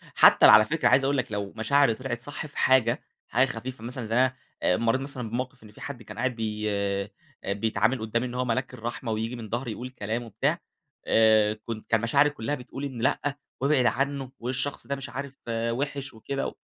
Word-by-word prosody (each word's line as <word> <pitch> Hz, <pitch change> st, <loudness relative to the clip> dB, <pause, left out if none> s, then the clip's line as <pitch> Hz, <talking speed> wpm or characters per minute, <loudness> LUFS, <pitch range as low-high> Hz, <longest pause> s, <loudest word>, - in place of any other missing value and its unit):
حتّى -, -, +7 dB
على 110 Hz, -, +9 dB
فكرة 160 Hz, +6 st, +1 dB
عايز 135 Hz, -, +5 dB
أقول 140 Hz, +1 st, +1 dB
لك 125 Hz, -2 st, -2 dB
لو 100 Hz, -1 st, -3 dB
مشاعري 125 Hz, +3 st, +3 dB
طلعت 120 Hz, 0 st, -4 dB
صح 145 Hz, +5 st, -6 dB
في 150 Hz, -, -12 dB
حاجة 125 Hz, -2 st, +3 dB, 0.2 s
حاجة 125 Hz, +3 st, +3 dB
خفيفة 125 Hz, -1 st, -6 dB
مثلًا 120 Hz, 0 st, -4 dB
زي 110 Hz, +1 st, -2 dB
أنا 130 Hz, +1 st, +4 dB, 0.3 s
مريت 115 Hz, +7 st, +2 dB
مثلًا 135 Hz, -4 st, -5 dB
بموقف 125 Hz, +2 st, -4 dB
إن 105 Hz, -, -13 dB
فيه -, -, -16 dB
حد 135 Hz, -5 st, -7 dB
كان -, -, -10 dB
قاعد 130 Hz, -1 st, 0 dB
بي 105 Hz, -1 st, -2 dB
آآ، 100 Hz, 0 st, -1 dB, 0.4 s
بيتعامل 110 Hz, +4 st, +1 dB
قدّامي 115 Hz, +2 st, -1 dB
إن 120 Hz, -, -5 dB
هو 125 Hz, 0 st, 0 dB
ملاك 125 Hz, +2 st, -1 dB
الرحمة 120 Hz, +1 st, -4 dB
وييجي 110 Hz, +3 st, -2 dB
من 115 Hz, -3 st, -8 dB
ضهري 120 Hz, +2 st, -2 dB
يقول 125 Hz, +4 st, -6 dB
كلام 115 Hz, -1 st, -3 dB
وبتاع 115 Hz, -4 st, -1 dB, 0.5 s
آآ، 110 Hz, -1 st, +5 dB
كنت 115 Hz, -2 st, -6 dB
كان 115 Hz, -2 st, +3 dB
مشاعري 140 Hz, +5 st, +4 dB
كلّها 145 Hz, 0 st, -3 dB
بتقول 135 Hz, +1 st, -7 dB
إن 130 Hz, -4 st, -5 dB
لأ 140 Hz, +3 st, 0 dB, 0.2 s
وابعد 140 Hz, -2 st, +3 dB
عنّه 135 Hz, +1 st, 0 dB
والشخص 130 Hz, +4 st, -3 dB
ده 140 Hz, -, -1 dB
مش 135 Hz, -, -6 dB
عارف 140 Hz, 0 st, -6 dB
وحش 130 Hz, +4 st, -2 dB
وكده، 135 Hz, +5 st, -4 dB
120 Hz, 200 wpm, -27 LUFS, 110-135 Hz, 0.5 s, على